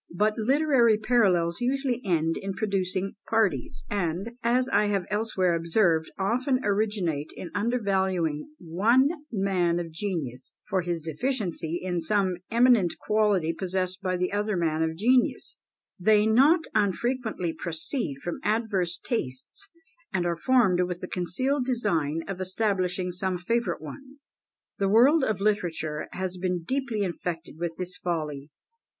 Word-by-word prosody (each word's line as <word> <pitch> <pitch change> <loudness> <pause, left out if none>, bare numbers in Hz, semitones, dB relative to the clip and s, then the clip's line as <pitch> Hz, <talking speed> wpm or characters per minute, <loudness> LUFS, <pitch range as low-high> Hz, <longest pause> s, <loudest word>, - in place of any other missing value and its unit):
But 210 +3 +2
literary 250 -1 +3
parallels 195 -6 +2
usually 255 -1 0
end 165 -4 +1
in 195 0 -4
producing 195 -1 -1 0.2
parties; 200 - 0
and, 195 +2 -2
as 245 +2 +2
I 210 - +3
have 200 -3 0
elsewhere 210 -4 +1
observed, 165 -1 +2
often 255 +7 +1
originate 200 -8 0
in 175 - -7
undervaluing 190 - 0
one 215 - +3 0.2
man 190 -5 +1
of 170 -1 -5
genius, 155 - -4
for 190 -3 +1
his 170 -2 -3
deficiency 170 - -2
in 180 -2 -2
some 190 +1 +1
eminent 235 -6 +4
quality 205 -6 +1
possessed 185 +1 -2
by 185 -2 -1
the 180 0 -1
other 205 -1 0
man 160 -2 0
of 160 0 -1
genius; 245 +6 +2 0.4
they 210 +3 +4
not 275 +10 +5
unfrequently 215 -3 0
proceed 165 - -3
from 175 - -4
adverse 205 -5 0
tastes, 225 - -4 0.4
and 180 -3 0
are 170 -1 0
formed 195 -2 +3
with 180 0 -2
the 180 - -5
concealed 250 - -1
design 165 - 0
of 190 -1 -5
establishing 185 -2 0
some 185 +1 -2
favourite 180 -2 -1
one. 265 - -10 0.6
The 195 -1 +2
world 265 +9 +5
of 215 -6 0
literature 170 -7 -1
has 185 0 -3
been 180 -1 -2
deeply 240 -2 -1
infected 170 -3 -4
with 170 -1 -3
this 180 0 -4
folly. 150 -5 -3
190 Hz, 135 wpm, -27 LUFS, 170-225 Hz, 0.6 s, not